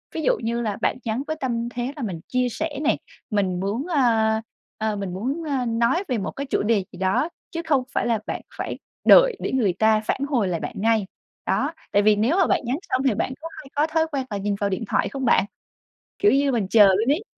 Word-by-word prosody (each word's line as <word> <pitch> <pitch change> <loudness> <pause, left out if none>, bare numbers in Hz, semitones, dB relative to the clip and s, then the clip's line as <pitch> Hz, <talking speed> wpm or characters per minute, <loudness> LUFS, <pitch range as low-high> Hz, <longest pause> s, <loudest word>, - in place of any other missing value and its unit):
Ví 320 - -1
dụ - - +2
như 235 +1 -1
là 215 -3 -1
bạn - - +1
nhắn 230 +4 -1
với 315 - -2
tâm 235 -2 -2
thế 245 +3 -4
là 285 - -5
mình 185 -6 -4
chia 250 0 +1
sẻ 295 +3 -4
nè, - - +2 0.3
mình 195 -5 0
muốn, 210 - -2
ơ, 315 -6 +1 0.8
ơ, 220 -1 -1
mình 195 -3 -4
muốn, 260 - -3
ơ, 275 -5 -1
nói 235 - +1
về 250 -4 0
một 195 - -3
cái 280 - -5
chủ 270 - 0
đề 210 -2 +2
gì - - -11
đó, 190 - +1 0.2
chứ 335 - -3
không 285 -5 +2
phải - - 0
là 230 -2 +1
bạn - - -4 0.2
phải - - -4 0.3
đợi - - +7
để - - -3
người 230 -8 +2
ta 220 +3 +3
phản 220 - -2
hồi 240 -9 +1
lại 175 -2 -1
bạn - - -5
ngay. 220 0 +2 0.4
Đó. - - 0 0.2
Tại 205 - +4
vì 210 0 +5
nếu 230 - +2
mà 375 - +4
bạn - - +2
nhắn 250 +4 -1
xong 255 - +1
thì 255 - +3
bạn 225 +4 -1
có 325 - -5
hay 305 - -11
có 295 +2 +2
thói 320 0 +1
quen 270 -3 -2
là 205 - -3
nhìn 200 +1 -1
vào 200 - 0
điện 195 +4 -2
thoại - - +1
không 270 -1 -4
bạn? 195 - +4 0.7
Kiểu 410 - +5
như 280 0 +3
mình 225 -6 0
chờ 210 -2 +7
luôn 205 +7 +3
ấy. 315 +9 0
235 Hz, 250 wpm, -23 LUFS, 210-280 Hz, 0.8 s, đợi